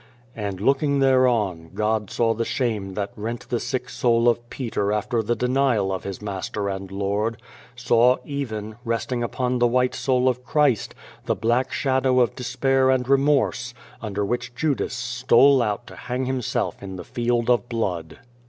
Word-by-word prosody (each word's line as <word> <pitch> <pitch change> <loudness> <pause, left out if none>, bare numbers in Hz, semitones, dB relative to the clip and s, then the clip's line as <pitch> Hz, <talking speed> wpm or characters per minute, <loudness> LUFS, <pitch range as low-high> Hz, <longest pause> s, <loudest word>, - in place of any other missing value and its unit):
" - - -31
And 100 -4 -4
looking 140 +5 +2
thereon 120 -11 +2
God 105 -1 0
saw 115 -1 +1
the 115 +1 -2
shame 110 -6 -2
that 100 -1 -3
rent 115 +3 -5
the 120 - 0
sick 125 +1 -3
soul 120 -1 +2
of 120 0 +1
Peter 110 -5 -2
after 105 +2 0
the 120 +2 -1
denial 125 -6 +1
of 95 - -5
his 100 +1 -6
Master 100 0 -3
and 95 -1 -5
Lord; 100 +3 -1 0.4
saw, 120 +1 +4
even, 110 -7 -5
resting 120 +1 -2
upon 125 +1 -1
the 120 - +4
white 125 +1 +2
soul 130 -1 +1
of 125 0 0
Christ, 135 -5 +1 0.3
the - - 0
black 120 +3 +1
shadow 130 -1 +2
of 120 -4 +3
despair 130 +1 +1
and 130 -2 +2
remorse 135 -3 +2 0.3
under 105 -2 -2
which 120 +2 -3
Judas 145 -2 -1
stole 125 +2 +4
out 105 +1 -1
to - - -12
hang 125 +1 -3
himself 130 -2 -2
in 95 -1 -7
the 90 - -7
Field 120 +3 -1
of 120 0 +2
Blood. 90 -9 -3
120 Hz, 170 wpm, -23 LUFS, 105-130 Hz, 0.4 s, saw